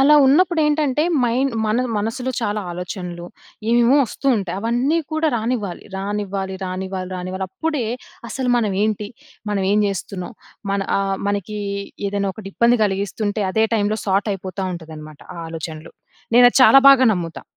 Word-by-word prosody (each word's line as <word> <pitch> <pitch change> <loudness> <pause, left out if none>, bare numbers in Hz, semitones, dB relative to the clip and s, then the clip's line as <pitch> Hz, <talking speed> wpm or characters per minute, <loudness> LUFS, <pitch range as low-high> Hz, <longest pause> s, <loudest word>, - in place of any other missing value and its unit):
అలా 290 +3 +6
ఉన్నప్పుడెటంటే 300 -1 +3 0.2
మైన్ 250 +3 +1
మనది 240 +4 0
మనసులో 245 +5 -2
చాలా 210 -1 -1
ఆలోచనలు, 175 -1 -6 0.4
ఏమేమో 240 +3 +4
ఒస్తూ 275 - -7
ఉంటాయి. 190 -3 -3
అవన్నీ 245 +8 +1
కూడా 315 0 +1
రానివ్వాలి. 220 -5 -3
రానివ్వాలి, 195 -1 -3
రానివ్వాలి, 185 0 -4
రానివ్వాలి. 185 +1 -4
అప్పుడే 295 +4 -2 0.4
అసలు 255 0 -2
మనమేంటి? 210 -1 0 0.4
మనం 200 -2 0
ఏం 210 - +3
జెస్తున్నాం? 195 +2 -5 0.4
మన 200 - 0 0.2
ఆహ్, 195 0 -1
మనకి 205 +1 -3 0.5
ఏదైనా 200 -1 -1
ఒకటి 195 -3 -9
ఇబ్బంది 235 +1 +4
గలిగిస్తుంటే, 205 +2 -2
అదే 220 0 +3
టైమ్‌లో 215 0 0
సార్ట్ 195 +2 +1
అయిపోతాటుందన్నమాట. 170 -5 -7 0.2
ఆ - - -8
ఆలోచనలు. 160 -1 -7 0.4
నేను 245 - +8
అది - - +2
చాలా 270 - +8
బాగా 265 -2 +7
నమ్ముతా. 170 -3 -4
205 Hz, 135 wpm, -20 LUFS, 190-245 Hz, 0.5 s, నేను